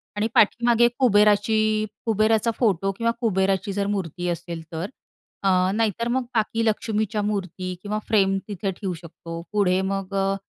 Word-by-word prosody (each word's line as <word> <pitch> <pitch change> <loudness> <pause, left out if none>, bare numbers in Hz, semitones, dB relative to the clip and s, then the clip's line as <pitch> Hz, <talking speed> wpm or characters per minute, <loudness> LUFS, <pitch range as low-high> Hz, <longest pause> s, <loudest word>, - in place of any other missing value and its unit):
आणि 210 +1 0
पाठीमागे 235 +2 +4
कुबेराची 210 -2 +4 0.5
कुबेराचा 220 +1 +2
फोटो 195 -5 +2
किंवा 230 0 +1
कुबेराची 195 -2 +1
जर 200 0 -1
मूर्ती 180 -2 -3
असेल, 170 -1 -4
तर 165 +4 -4 0.5
अ, 195 - +3 0.2
नाहीतर 225 +1 0
मग 255 +2 +1
बाकी 225 +1 +1
लक्ष्मीच्या 215 -1 0
मूर्ती 190 -3 -3
किंवा 210 +1 -3
फ्रेम 195 -3 +3
तिथे 200 -1 -3
ठेऊ 190 0 -4
शकतो. 165 0 -8
पुढे 190 -3 +2
मग 195 0 -4
अ, 195 0 +1
205 Hz, 145 wpm, -24 LUFS, 190-220 Hz, 0.5 s, पाठीमागे